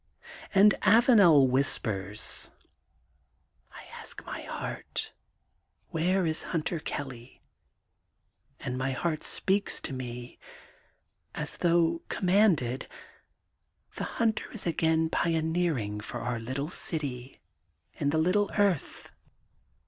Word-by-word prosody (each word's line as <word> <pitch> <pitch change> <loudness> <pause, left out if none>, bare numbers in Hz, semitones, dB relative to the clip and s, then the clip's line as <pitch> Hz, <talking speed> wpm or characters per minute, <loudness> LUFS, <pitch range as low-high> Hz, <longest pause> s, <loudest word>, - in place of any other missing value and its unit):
And 205 +2 +7
Avanel 205 - +6
whispers: 110 -6 -1 0.6
— - - -38
^I - - -11
ask - - -8
my - - -6
heart: - - -5 0.4
— - - -40
^Where 180 +2 +2
is 160 0 0
Hunter 165 0 -2
Kelly, 130 -5 -7 1.2
and 125 +1 -4
my 135 0 -1
heart 155 +3 -2
speaks 195 +1 0
to 135 - -5
me 125 -1 -7 1.0
as - - -2
though 170 -1 +2
commanded: 180 - +2 1.1
'The - - -4
Hunter 225 -2 0
is 225 - -5
again 160 -1 +2
pioneering 160 -10 0
for 110 +3 -6
our 120 0 -2
little 135 +7 -4
city 135 -8 -4 0.5
in 140 - -1
the 160 - +1
little 185 +6 +2
earth. 200 -8 0
160 Hz, 105 wpm, -29 LUFS, 130-180 Hz, 1.2 s, And